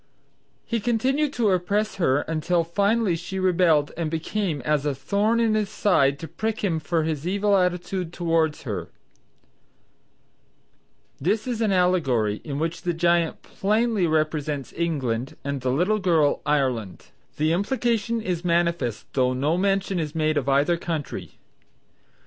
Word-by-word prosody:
He 230 - -1
continued 260 +6 +1
to 225 -6 +2
oppress 200 +4 0
her 145 -6 +2
until 165 +2 0
finally 200 +3 +1
she 180 +3 -6
rebelled 175 -5 +3
and 165 -2 -2
became 165 +1 -2
as 150 +2 0
a 145 -2 -1
thorn 200 - +1
in 225 -2 +2
his 215 -2 0
side 140 -9 +2
to 165 - -7
prick 220 +4 -3
him 170 -5 +1
for 160 +2 0
his 155 0 -3
evil 200 +2 +2
attitude 180 -1 -1
towards 165 -3 0
her;" 95 - -4 2.3
this 205 +9 0
is 240 -3 -3
an 215 -3 +2
allegory 140 - +1
in 140 -3 -4
which 165 +2 -2
the 175 - -1
giant 170 0 +1
plainly 215 -2 +1
represents 155 -3 -1
England 135 -7 -2
and 140 -1 -3
the 130 - -1
little 180 +11 +1
girl, 165 -6 +2
Ireland; 125 - -1 0.3
the 155 +2 +2
implication 230 +2 0
is 180 -4 -3
manifest 170 - 0
though 130 -1 +2
no 145 +6 +1
mention 195 0 0
is 155 -1 -4
made 155 -1 +1
of 140 -2 0
either 145 +5 +3
country. 165 -4 -5
170 Hz, 145 wpm, -24 LUFS, 150-200 Hz, 2.3 s, rebelled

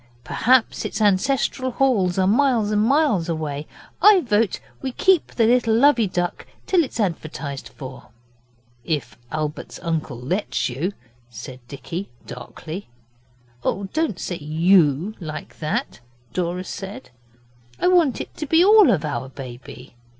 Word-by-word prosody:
Perhaps 250 0 +2
its - - -4
ancestral 245 +6 +1
halls 230 -9 +1
are 190 - +3
miles 230 0 +3
and 210 0 +2
miles 230 - +2
away. 155 -2 -3 0.3
I 415 -3 +7
vote 220 - +1 0.2
we 265 -2 -3
keep 380 +1 +3
the 230 - +1
little 235 -1 +3
Lovey 235 -3 +5
Duck 175 -1 -3 0.2
till 360 -3 +3
it's 260 - -7
advertised 155 - -3
for.' 130 +2 -10 0.8
'If 120 -7 -3 0.2
Albert's 155 -1 -4
uncle 155 -7 -2
lets 125 -3 -1
you,' 155 +11 -2 0.4
said 125 +2 -9
Dicky 165 +7 -6 0.2
darkly. 155 +9 -8 0.8
'Oh, 195 0 -1
don't 310 - 0
say 175 - -4
"you" 160 +3 +3
like 155 -4 -7
that,' 155 -5 -2 0.3
Dora 180 +1 -2
said; 190 -9 -8 0.7
'I 360 - +3
want 340 -8 +3
it - - -7
to 305 - -4
be 330 +5 +5
all 420 -3 +7
of 170 -9 +2
our 130 -3 -3
baby. 125 -1 -10
185 Hz, 135 wpm, -22 LUFS, 150-245 Hz, 0.8 s, I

